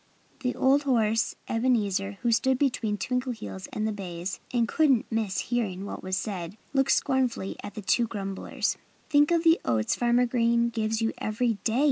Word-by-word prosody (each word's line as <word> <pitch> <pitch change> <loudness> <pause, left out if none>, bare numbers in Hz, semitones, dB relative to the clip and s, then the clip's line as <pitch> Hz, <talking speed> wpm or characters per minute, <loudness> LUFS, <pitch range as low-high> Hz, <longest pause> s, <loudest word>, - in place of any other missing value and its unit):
The 250 -2 -2
old 270 +2 +4
horse 225 -5 +1
Ebenezer, 210 -5 +1
who 240 - +2
stood 260 +3 +3
between 240 -6 0
Twinkleheels 230 - -3
and 215 0 -1
the - - 0
bays 185 -2 -5
and 235 -2 +2
couldn't 275 -7 +3
miss 215 -4 -1
hearing 200 -6 -1
what - - -6
was 185 0 -2
said, 190 -2 -4 0.2
looked 270 -1 +3
scornfully 255 -7 0
at 205 -1 -8
the 210 - -6
two 230 +6 +2
grumblers. 195 -3 -3 0.3
"Think 290 0 +5
of 340 -1 +2
the 330 0 +5
oats 110 -2 +1
Farmer 240 +1 +3
Green 235 -1 +2
gives 225 -1 -1
you 225 - 0
every 225 0 -1
day!" 230 +2 +1
225 Hz, 170 wpm, -27 LUFS, 200-250 Hz, 0.3 s, Think